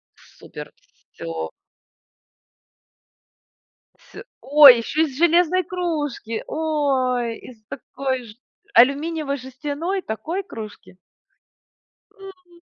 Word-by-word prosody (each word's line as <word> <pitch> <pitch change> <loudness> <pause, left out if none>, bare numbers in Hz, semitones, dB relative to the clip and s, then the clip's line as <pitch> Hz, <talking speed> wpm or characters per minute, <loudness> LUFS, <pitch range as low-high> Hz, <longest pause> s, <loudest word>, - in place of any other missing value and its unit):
Супер! - - -12 0.4
Всё! 80 -1 -6 2.5
С - - -13 0.2
ой, 280 -3 +8
еще 280 +7 -1
из 275 -4 -4
железной 345 +2 +3
кружки! 300 -11 -4
Ой, 265 -7 -1
из 225 -4 -14
такой 260 0 -4
же. 215 -2 -13 0.4
Алюминиевой 285 +3 +3
жестяной, 290 +8 -4
такой 325 - -4
кружки? 215 - -11 1.2
М. 365 -3 -15
285 Hz, 80 wpm, -22 LUFS, 245-335 Hz, 2.5 s, ой